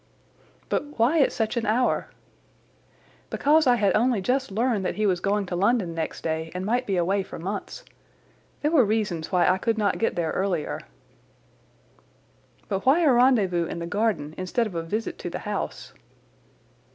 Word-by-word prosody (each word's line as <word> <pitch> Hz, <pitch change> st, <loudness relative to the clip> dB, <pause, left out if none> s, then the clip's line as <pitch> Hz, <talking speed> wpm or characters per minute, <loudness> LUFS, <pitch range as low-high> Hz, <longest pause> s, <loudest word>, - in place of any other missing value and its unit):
"But 295 Hz, 0 st, -3 dB
why 250 Hz, +9 st, +3 dB
at -, -, +3 dB
such 220 Hz, +1 st, -2 dB
an 230 Hz, -2 st, -1 dB
hour?" 245 Hz, +4 st, +1 dB, 1.2 s
"Because 305 Hz, +1 st, +3 dB
I 245 Hz, -, +6 dB
had 200 Hz, -5 st, +2 dB
only 235 Hz, 0 st, +2 dB
just 260 Hz, +7 st, 0 dB
learned 220 Hz, 0 st, 0 dB
that -, -, -2 dB
he 215 Hz, -, 0 dB
was 185 Hz, -3 st, +2 dB
going 200 Hz, +2 st, 0 dB
to 180 Hz, -, -4 dB
London 195 Hz, -2 st, +1 dB
next 165 Hz, -1 st, -4 dB
day 160 Hz, 0 st, -2 dB
and 185 Hz, +1 st, -3 dB
might 245 Hz, +4 st, 0 dB
be 195 Hz, -2 st, 0 dB
away 190 Hz, +3 st, +1 dB
for 190 Hz, -, -8 dB
months. 200 Hz, -, -6 dB, 0.8 s
There 300 Hz, -, +2 dB
were 305 Hz, -6 st, +5 dB
reasons 205 Hz, -7 st, -1 dB
why 180 Hz, -1 st, +3 dB
I 185 Hz, +1 st, +3 dB
could 225 Hz, +3 st, 0 dB
not 205 Hz, -3 st, 0 dB
get 225 Hz, -, 0 dB
there 165 Hz, -2 st, -1 dB
earlier." 185 Hz, -5 st, -1 dB, 1.9 s
"But 195 Hz, -2 st, -2 dB
why 275 Hz, +7 st, +4 dB
a 305 Hz, -5 st, +5 dB
rendezvous 210 Hz, -9 st, +3 dB
in -, -, -5 dB
the 170 Hz, -, -4 dB
garden 205 Hz, -5 st, -1 dB
instead 185 Hz, +6 st, 0 dB
of 215 Hz, -, -6 dB
a 165 Hz, -, -2 dB
visit 210 Hz, +7 st, -4 dB
to -, -, -5 dB
the -, -, -4 dB
house?" -, -, -4 dB
205 Hz, 175 wpm, -25 LUFS, 180-240 Hz, 1.9 s, I